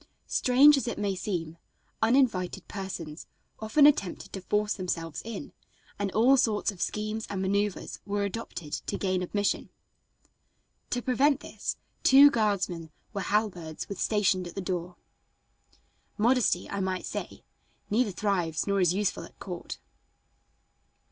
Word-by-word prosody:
Strange 275 +4 +6
as 270 - -2
it - - -3
may 205 -1 0
seem, 170 -4 -4 0.4
uninvited 225 -6 +2
persons 180 -6 -6 0.3
often 280 +7 +4
attempted 235 -11 +2
to 195 - -5
force 210 +3 0
themselves 165 -4 -3
in, 230 +5 -7 0.5
and 200 -1 -1
all 245 +5 +5
sorts 220 -4 +1
of 190 - -11
schemes 215 +1 -2
and 195 - -3
maneuvers 200 +1 -1
were 205 0 -1
adopted 200 -7 -5
to - - -3
gain 185 -2 0
admission. 205 +3 -1 1.2
To 245 -1 -2
prevent 275 +3 +3
this, - - -4 0.2
two 280 +2 +8
guardsmen 195 -8 0 0.2
with 195 -2 -3
halberds 180 -7 -1
were 200 - -4
stationed 190 -3 +1
at 170 - -10
the - - -3
door. 180 -2 -3 1.2
Modesty, 230 -4 +2
I 200 - -4
might 185 -1 -2
say, - - -6 0.5
neither 230 +1 +2
thrives 180 -5 -1
nor 200 -1 +1
is 180 0 +3
useful 205 0 -1
at - - -14
court. - - -7
200 Hz, 135 wpm, -28 LUFS, 180-225 Hz, 1.2 s, two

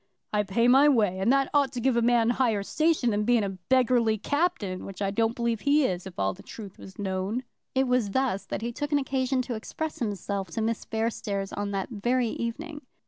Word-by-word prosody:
"I 210 - +3
pay 210 +4 +1
my 270 +4 +7
way, 210 -8 +2
and 200 +6 +3
that 275 0 +2
ought 285 -3 +3
to 250 - -3
give 255 +1 +2
a 235 - +3
man 235 0 +3
higher 230 -5 +1
station 310 -1 +1
than 210 0 0
being 235 0 +3
a 195 -2 -4
beggarly 245 -4 +3
captain, 230 - -1
which 195 -2 -8
I 195 -1 0
don't 225 +3 +1
believe 235 -2 -1
he 290 0 +3
is, 180 -3 -2
if 185 - -11
all 95 0 0
the - - -13
truth 205 -4 -10
was 190 - -12
known." 195 +4 -2 0.3
It 265 0 +2
was 250 -4 +2
thus 250 -3 -1
that - - -4
he 235 - -2
took 290 +5 -4
an 290 - +4
occasion 265 -1 0
to 245 - -4
express 305 +8 -5
himself 200 -3 -3
to 225 - -1
Miss 225 0 -2
Fairstairs 215 -3 -2
on 205 0 -2
that 195 -1 -3
very 240 +3 0
evening. 290 +8 -5
230 Hz, 220 wpm, -27 LUFS, 200-260 Hz, 0.3 s, my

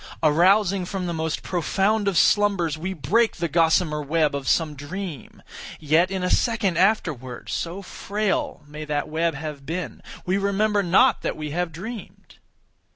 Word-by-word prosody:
Arousing 185 +5 +4
from 185 0 -4
the 170 - -2
most 160 -1 -3
profound 195 +4 0
of 195 -4 +1
slumbers, 195 -7 +3
we 175 +5 -4
break 190 - +1
the 170 0 -2
gossamer 160 -1 +2
web 155 +1 +1
of 140 -1 -4
some 160 -3 +2
dream. 150 +1 -7 0.4
Yet 160 +4 +3
in 190 -1 -3
a 180 - 0
second 220 -7 +1
afterward, 155 - 0
(so 175 +4 -4
frail 205 +2 -2
may 150 +1 -8
that 150 0 -2
web 165 +1 0
have 150 -1 -6
been) 160 -3 -5 0.2
we 190 +2 +1
remember 205 +1 +1
not 195 +8 +4
that - - -3
we 150 -1 -5
have 175 +2 -2
dreamed. 210 +8 -9
175 Hz, 160 wpm, -24 LUFS, 155-195 Hz, 0.4 s, Arousing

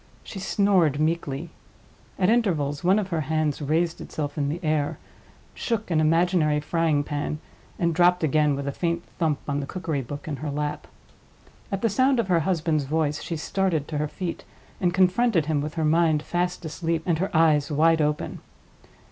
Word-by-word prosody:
She 195 - -8
snored 190 -6 +2
meekly. 155 -1 -1 0.7
At 185 - +2
intervals 170 -11 +1
one 185 +3 +4
of 200 -3 -1
her 165 -3 -1
hands 155 0 -1
raised 165 +4 0
itself 145 -2 -4
in 140 -2 -1
the 160 +4 -3
air, 155 -2 0 0.6
shook 220 -5 -3
an 155 -1 +3
imaginary 165 -1 +3
frying 155 -1 +1
pan, 145 +1 -3 0.4
and 170 -1 +1
dropped 180 +1 +3
again 150 -1 +3
with 140 0 -4
a - - 0
faint 170 +3 -2 0.2
thump 160 -4 +1
on 145 -1 -1
the 140 - -4
cookery 160 -6 -3
book 145 +5 -8
in 145 -3 -3
her 150 +1 -4
lap. 145 +1 -3 0.8
At 195 +1 -3
the - - +4
sound 260 +4 +3
of 215 -5 -1
her 175 -2 +4
husband's 160 -3 0
voice, 150 0 0
she 165 - -4
started 165 -2 -1
to 150 -2 -2
her 150 - 0
feet, 170 +3 -5 0.4
and 180 -2 +2
confronted 185 0 +3
him 150 -2 0
with 150 +2 -5
her 160 -2 0
mind 155 -1 +3
fast 175 0 -2
asleep, 165 +1 -2
and 170 -3 +1
her 190 - 0
eyes 150 -3 +3
wide 160 +2 +4
open. 150 0 -1
160 Hz, 180 wpm, -25 LUFS, 150-180 Hz, 0.8 s, one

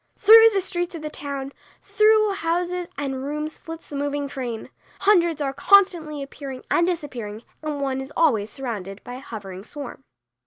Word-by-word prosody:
Through 450 +2 +9
the 395 -2 +1
streets 350 -1 -2
of 315 - -7
the 305 - -4
town, 280 -2 -5 0.3
through 430 0 +3
houses 355 0 -1
and 270 -2 -3
rooms 300 +2 -4
flits 325 0 -9
the 290 - -7
moving 285 0 -2
train. 245 -5 -5 0.3
Hundreds 345 -6 +3
are 275 -1 -1
constantly 315 -2 +3
appearing 275 -1 -8
and 340 - +3
disappearing 245 -11 -4 0.2
and 305 -2 -3
one 265 -1 -1
is 265 +2 -8
always 225 -10 +3
surrounded 210 -7 -6
by 245 - -8
a 250 - -7
hovering 195 -7 -8
swarm. 270 +2 -8
290 Hz, 165 wpm, -23 LUFS, 265-345 Hz, 0.3 s, Through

